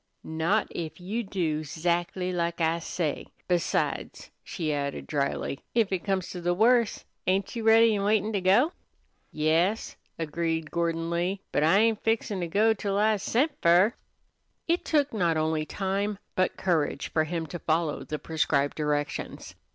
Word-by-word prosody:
"Not 160 +7 0
if 165 0 -5
you 200 +7 -3
do 165 -7 -2
'zactly 175 +4 -1
like 170 -1 -1
I 165 0 +1
say. 165 -2 -3 0.2
Besides," 175 -2 -1
she 155 -4 -3
added 140 -1 -3
dryly, 140 -1 -2 0.2
"if 225 -4 +2
it 185 -2 -1
comes 190 -3 -1
to 180 - -6
the 175 +1 +1
worst, 230 +2 +3 0.2
ain't 190 +5 0
you 230 - -2
ready 225 0 +6
an' 200 - -1
waitin' 215 +1 +1
to 200 - 0
go!" 205 - +4 0.6
"Yas," 165 +8 +1 0.2
agreed 165 0 -2
Gordon 165 -1 -1
Lee; 180 +3 -1
"but - - +1
I 160 +5 +5
ain't 220 0 +2
fixin' 225 -3 0
to 175 - -2
go 215 +6 +3
till 200 -1 -2
I's 210 -1 +2
sent 280 +7 +1
fer." 180 +6 +5 0.7
It 340 +1 +1
took 290 -4 +1
not 170 -6 +1
only 155 0 0
time, 200 +1 -2 0.2
but 185 0 0
courage, 165 -6 0
for 155 -1 +2
him 165 0 -3
to 165 +3 -7
follow 160 -1 0
the 150 - -4
prescribed 145 -2 0
directions. 150 -1 -2
175 Hz, 160 wpm, -27 LUFS, 160-205 Hz, 0.7 s, ready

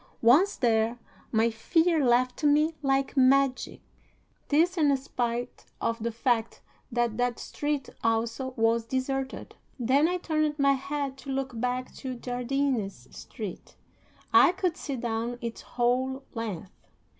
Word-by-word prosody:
Once 295 - +5
there, 230 -1 +1 0.3
my 230 +1 +3
fear 320 +7 +2
left 250 +2 +2
me 300 +2 +4
like 270 0 0
magic. 265 0 +3 0.7
This 335 +5 +3
in 290 -5 +3
spite 245 -2 -3
of 230 0 -1
the 235 +1 -1
fact 230 0 -1 0.3
that 240 -2 0
that 245 -1 0
street 290 -3 -3 0.2
also 230 +3 -1
was 225 0 +2
deserted. 265 +1 -3 0.2
Then 265 +6 +3
I 360 +1 0
turned 310 -3 -1
my 275 -1 +4
head 275 0 -3
to 265 - -10
look 265 -3 -3
back 250 +1 -2
to 260 -1 -5
Jardines 245 - -2
Street. 210 -7 -8 0.6
I - - +7
could 360 -2 -1
see 280 - -5
down 235 0 -3
its 235 -1 -5
whole 255 +2 0
length. 205 -6 -6
255 Hz, 135 wpm, -28 LUFS, 235-280 Hz, 0.7 s, I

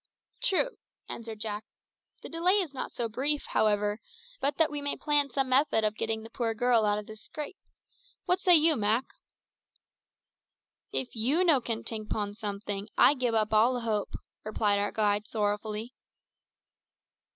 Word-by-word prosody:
"True," 485 +6 +1 0.3
answered 225 -1 -7
Jack. 210 -1 -4 0.6
"The - - -7
delay 340 +4 +2
is 365 -8 0
not 260 - -5
so 235 - -2
brief, 280 +6 0
however, 210 0 +1 0.4
but 280 +1 0
that 320 -2 +3
we 295 -1 -3
may 285 0 -2
plan 290 -1 +2
some 265 +1 0
method 260 -3 +3
of 215 0 0
getting 220 0 -2
the 225 - -11
poor 230 -2 -2
girl 235 -1 +3
out 205 0 +2
of 210 - -5
this 215 0 -9
scrape. 305 - -7 0.7
What 360 +1 +2
say 365 -2 +6
you, 315 0 +6
Mak?" 220 +2 +1 1.9
"If 255 - -2
you 265 +11 +2
no 315 -7 +4
can 230 -1 -3
tink 215 -2 -4
'pon 205 -1 -2
someting, 205 -1 -5
I - - +7
gib 250 -4 -1
up 215 -1 +1
all 240 +4 +4
hope," 215 -3 -2 0.3
replied 210 -1 +1
our 205 0 -1
guide 210 -1 0
sorrowfully. 210 +2 -2
225 Hz, 160 wpm, -29 LUFS, 215-285 Hz, 1.9 s, I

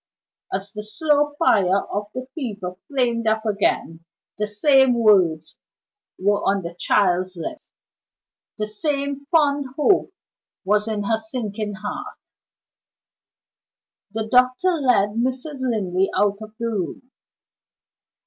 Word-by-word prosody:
As 195 +1 -4
the 210 - -5
slow 295 +6 +1
fire 195 - +3
of 205 +1 -4
the 255 0 -4
fever 210 - -5
flamed 240 -5 0
up 220 +1 +1
again, 200 -5 0 0.4
the 210 - 0
same 265 +4 +4
words 185 -9 +3 0.6
were 205 +2 +1
on 195 -1 +1
the 170 0 -6
child's 185 0 +1
lips, 310 - -7 0.9
the 215 - -1
same 280 +5 -2
fond 290 -4 +2
hope 375 +5 +3 0.5
was 210 +2 +2
in 215 -2 -2
her 220 +2 +1
sinking 220 -2 -4
heart. 210 +1 -6 1.9
The 220 +1 -3
doctor 255 +8 +3
led 250 - +3
Mrs. 260 +6 -3
Linley 195 -7 0
out 205 -1 +2
of 215 0 -10
the 235 - -3
room. 230 +4 -4
220 Hz, 120 wpm, -22 LUFS, 200-265 Hz, 1.9 s, same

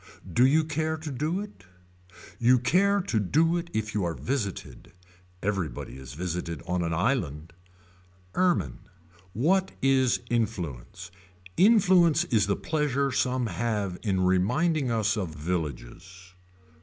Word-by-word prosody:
Do 125 +7 +5
you 155 +4 +3
care 155 +1 -2
to 155 -1 -6
do 155 +8 -2
it. 205 - -10 0.8
You 125 +1 +5
care 195 +11 +2
to 125 - -1
do 160 - +2
it 170 0 -5
if 110 0 -3
you 105 - 0
are 85 -2 -2
visited. 120 -8 -4 0.5
Everybody 95 -14 -3
is 65 0 -10
visited 85 -4 -4
on 90 0 -1
an 85 -1 -1
island. 85 - -1 0.8
Ermine. 180 -1 +1 0.5
What 185 - +1
is 130 -2 +2
influence. 90 - -3 0.4
Influence 180 -6 +5
is 115 - +1
the 100 - +1
pleasure 140 -3 -1
some 125 0 0
have 105 -2 -2
in 95 -4 0
reminding 125 - +1
us 110 -2 +1
of 90 -7 -4
villages. 90 +3 -5
115 Hz, 130 wpm, -27 LUFS, -, 0.8 s, Do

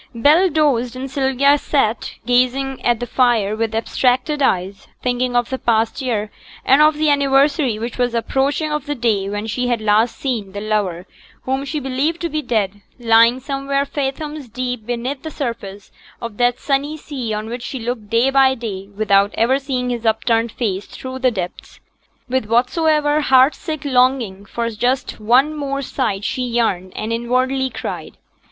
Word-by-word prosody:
Bell 305 +10 +4
dozed, 270 -6 +1
and 260 +1 -6
Sylvia 275 +1 +3
sate 240 -7 0
gazing 255 +2 +1
at 240 -2 +2
the 245 - -3
fire 230 -4 +2
with 225 0 -2
abstracted 255 +5 0
eyes, 195 -5 0 0.2
thinking 250 0 0
of 240 +1 +1
the 260 - -2
past 225 +3 +1
year 215 -5 -2 0.3
and 270 +3 +5
of 305 0 +5
the 305 0 +2
anniversary 280 -2 +2
which 235 +3 -5
was 245 -1 +1
approaching 275 +6 0
of 300 -1 -3
the 290 - -2
day 215 -6 0
when 205 +1 -3
she 245 +3 -2
had 240 -2 +1
last 220 +2 +2
seen 225 -8 -3
the 200 - -4
lover 205 -5 -1 0.4
whom 265 +1 -2
she 300 +2 -3
believed 275 +5 -1
to 340 - -1
be 310 0 -2
dead, 205 -6 -1 0.2
lying 230 +1 +4
somewhere 275 0 -1
fathoms 285 0 -4
deep 250 -1 -4
beneath 245 +3 -3
the 315 - -6
surface 220 -9 -6 0.3
of 230 -3 -7
that 245 0 +2
sunny 285 +2 -1
sea 265 -7 -5
on 215 +1 -3
which 240 +2 -5
she 265 - -5
looked 230 -3 -4
day 235 +4 +3
by 265 -1 +4
day 200 -5 -6
without 200 -2 +3
ever 255 +4 +2
seeing 255 -3 -2
his 235 -2 -3
upturned 225 +1 +1
face 205 -5 -3
through 260 0 -7
the 260 -1 +3
depths, 185 -6 -6 0.5
with 260 -2 0
whatsoever 295 +6 +2
heart 265 0 +5
sick 310 -4 -6
longing 250 -7 +1
for 235 +3 -3
just 250 +5 -1
one 255 +8 +3
more 275 -1 -3
sight 220 -7 -2
she 255 - -2
yearned 230 -7 0
and 220 +2 -3
inwardly 255 +3 0
cried. - - -6
250 Hz, 175 wpm, -19 LUFS, 225-275 Hz, 0.5 s, and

